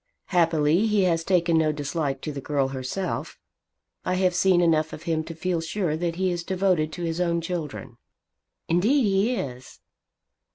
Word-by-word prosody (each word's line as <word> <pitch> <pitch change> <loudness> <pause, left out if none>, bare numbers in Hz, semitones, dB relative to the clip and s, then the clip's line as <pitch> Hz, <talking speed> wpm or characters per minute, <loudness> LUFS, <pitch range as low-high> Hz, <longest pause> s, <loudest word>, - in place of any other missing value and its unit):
Happily 165 +1 +3
he 210 -2 +2
has 165 -3 +1
taken 170 -2 +2
no 155 -1 +2
dislike 145 -2 -3
to 155 - -4
the 140 -1 -6
girl 140 -1 0
herself. 135 +8 -4 0.7
I 185 - 0
have 185 -1 +2
seen 185 0 +3
enough 160 -3 +2
of 155 - -8
him 165 -2 -1
to 165 0 -7
feel 175 0 -1
sure 165 -1 -1
that 165 +1 -2
he 185 +1 0
is 175 -1 -3
devoted 180 -4 +1
to 175 - -5
his 165 +1 -2
own 170 -1 +1
children." 160 -8 -5 0.7
"Indeed 215 - +3
he 205 +4 +2
is." 125 - -6
170 Hz, 170 wpm, -25 LUFS, 155-185 Hz, 0.7 s, Happily